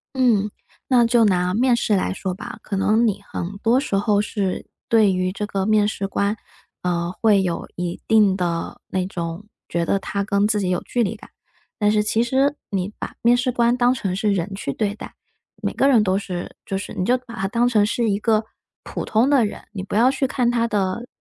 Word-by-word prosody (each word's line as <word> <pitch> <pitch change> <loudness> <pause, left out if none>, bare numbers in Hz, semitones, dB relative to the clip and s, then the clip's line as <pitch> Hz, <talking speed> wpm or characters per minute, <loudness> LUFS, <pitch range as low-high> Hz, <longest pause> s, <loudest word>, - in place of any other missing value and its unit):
嗯， 225 -6 +2 0.4
那 245 -3 +5
就 230 0 +4
拿 180 -3 +2
面 245 +3 +3
试 220 -3 +1
来 190 - 0
说 190 -1 -3
吧， 185 - -8
可 200 - -4
能 215 +4 +3
你 205 -1 -1
很 185 +4 -4
多 230 +4 +3
时 270 - -2
候 205 +1 +2
是 200 -3 -3 0.2
对 215 -4 +4
于 185 0 0
这 200 +2 -4
个 195 -2 -2
面 210 -1 +3
试 200 -2 -3
官， 200 +1 0 0.5
呃， 175 -1 -1
会 210 -3 +5
有 175 -3 -3
一 175 -1 -4
定 210 -3 +5
的 170 -3 -3
那 185 -1 -1
种 170 +2 -5 0.2
觉 170 0 0
得 195 - +1
他 200 +1 -3
跟 200 0 +2
自 210 -1 +1
己 190 -3 -1
有 180 -1 0
距 245 - -1
离 220 0 0
感， 215 - -14 0.5
但 210 -1 +3
是 210 0 +2
其 220 +2 +1
实 270 +4 +1
你 195 0 -2
把 - - -6
面 240 +1 +4
试 250 0 0
官 240 0 +2
当 245 0 +4
成 200 -7 -2
是 205 +2 +1
人 190 +1 -2
去 140 -8 -4
对 205 +3 -1
待， - - -9 0.5
每 - - 0
个 275 - +2
人 240 -6 +5
都 190 -1 +1
是 185 -3 -5
就 195 - -2
是 195 - -6
你 185 - -2
就 250 +4 +3
把 245 -2 -11
他 195 -4 -2
当 235 +4 +2
成 215 -4 +3
是 230 +1 0
一 200 0 0
个 220 0 +2 0.4
普 - - -5
通 230 +5 +2
的 275 -6 +4
人， 205 - -6
你 205 -3 -5
不 195 - -5
要 240 +4 +5
去 270 0 0
看 250 -2 +1
他 235 -1 +1
的 205 +2 -1
210 Hz, 240 characters per minute, -22 LUFS, 190-235 Hz, 0.5 s, 那